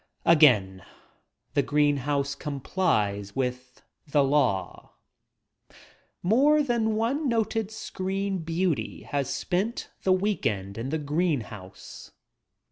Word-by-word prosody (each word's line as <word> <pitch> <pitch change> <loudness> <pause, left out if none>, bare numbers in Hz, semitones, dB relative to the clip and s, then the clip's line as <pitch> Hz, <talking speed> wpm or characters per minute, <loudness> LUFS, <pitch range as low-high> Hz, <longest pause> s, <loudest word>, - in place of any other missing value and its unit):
Again 105 - +5 0.7
the - - +3
green 145 -1 +2
house 140 0 -1
complies 125 - -1
with 125 -1 -4 0.2
the 145 -1 +3
law. 135 -9 0 1.3
More 280 +10 +4
than 230 -4 0
one 260 +7 0
noted 225 -2 0
screen 195 -2 -3
beauty 165 -1 -2
has 140 -2 -2
spent 190 - -2
the 190 - +1
week 195 +2 +1
end 100 0 -4
in 125 +4 -3
the 160 - 0
green 150 0 0
house. 100 -3 -11
150 Hz, 110 wpm, -26 LUFS, 125-195 Hz, 1.3 s, Again